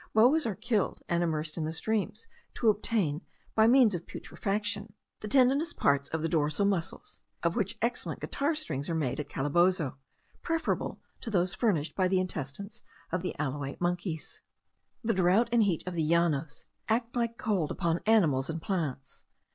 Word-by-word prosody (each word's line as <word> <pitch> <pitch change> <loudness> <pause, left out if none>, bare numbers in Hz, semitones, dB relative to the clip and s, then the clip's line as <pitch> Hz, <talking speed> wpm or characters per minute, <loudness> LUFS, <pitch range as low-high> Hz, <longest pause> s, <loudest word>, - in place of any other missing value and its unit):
Boas 255 +6 +5
are 210 - -2
killed, 215 -1 -1
and 170 0 +1
immersed 155 -1 -1
in - - -1
the 155 - -2
streams, 220 - -2 0.3
to 230 - +3
obtain, 200 -7 0 0.3
by 220 0 +5
means 245 -3 +6
of 175 -1 -4
putrefaction, 205 0 -3 0.3
the 215 - -6
tendinous 275 +7 +3
parts 140 0 +2
of 160 -1 -2
the - - +2
dorsal 155 +3 +1
muscles, 200 - -2 0.2
of - - +1
which - - -1
excellent - - -1
guitar 290 +3 -1
strings 145 - -3
are 165 - 0
made 145 -5 -1
at 145 -1 -4
Calabozo, 150 0 +1 0.4
preferable 330 -1 -1 0.2
to - - -6
those 180 -3 +1
furnished 170 -10 0
by 185 -1 +2
the 185 0 +2
intestines 180 +2 -5 0.3
of 180 +1 0
the 180 - -3
alouate 140 -1 -3
monkeys. 175 -2 -2 0.6
The 230 0 +2
drought 190 +6 +3
and 235 -1 +4
heat 190 -7 +1
of 180 - -4
the 170 - -1
Llanos 160 -2 +1 0.2
act 230 +2 0
like 235 -1 -1
cold 190 -8 0
upon 170 0 0
animals 160 -12 +4
and 165 0 -2
plants. 155 - -4
180 Hz, 170 wpm, -30 LUFS, 155-220 Hz, 0.6 s, means